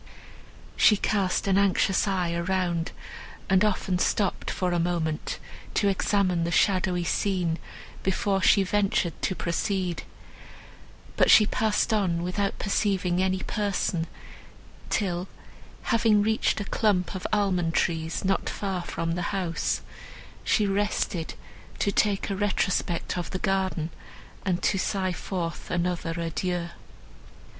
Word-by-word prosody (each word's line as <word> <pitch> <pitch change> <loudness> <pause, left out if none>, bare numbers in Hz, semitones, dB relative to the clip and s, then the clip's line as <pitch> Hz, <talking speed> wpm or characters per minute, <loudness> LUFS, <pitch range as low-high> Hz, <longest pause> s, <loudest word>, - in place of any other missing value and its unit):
She 210 - +6
cast 195 -3 0
an 195 -1 +3
anxious 195 0 +2
eye 180 -3 0
around, 175 -1 -1 0.6
and 190 +1 +5
often 190 -3 0
stopped 200 +1 0
for 180 -1 -1
a 175 - +1
moment 165 -3 -1 0.4
to 200 - +3
examine 190 -3 +1
the 170 - -1
shadowy 180 0 +2
scene 175 -2 0 0.4
before 195 0 0
she 200 +1 +5
ventured 195 -3 +1
to 190 - 0
proceed, 180 0 -1 1.2
but - - +4
she 215 - +8
passed 220 +1 +1
on 180 -5 +1
without 195 +3 -1
perceiving 195 -3 0
any 190 0 0
person, 195 -5 -1 0.8
till, 180 -2 -1 0.6
having 220 -3 +3
reached 220 +1 +1
a 205 - -3
clump 195 -4 +1
of 185 - -4
almond 185 -5 +1
trees, 160 +1 0
not 195 0 +1
far 190 -3 -3
from 165 -1 -3
the 175 +1 -1 0.2
house, 170 -3 -1 0.6
she 210 - +2
rested 195 -4 -1 0.4
to 200 - +1
take 200 0 +1
a - - -1
retrospect 190 -3 0
of 175 - -4
the 185 - -3
garden, 185 -4 -1 0.5
and 185 -2 0
to 195 - +2
sigh 185 -1 0
forth 175 -2 -4
another 175 -1 -1
adieu. 170 +1 -2
185 Hz, 125 wpm, -26 LUFS, 175-200 Hz, 1.2 s, she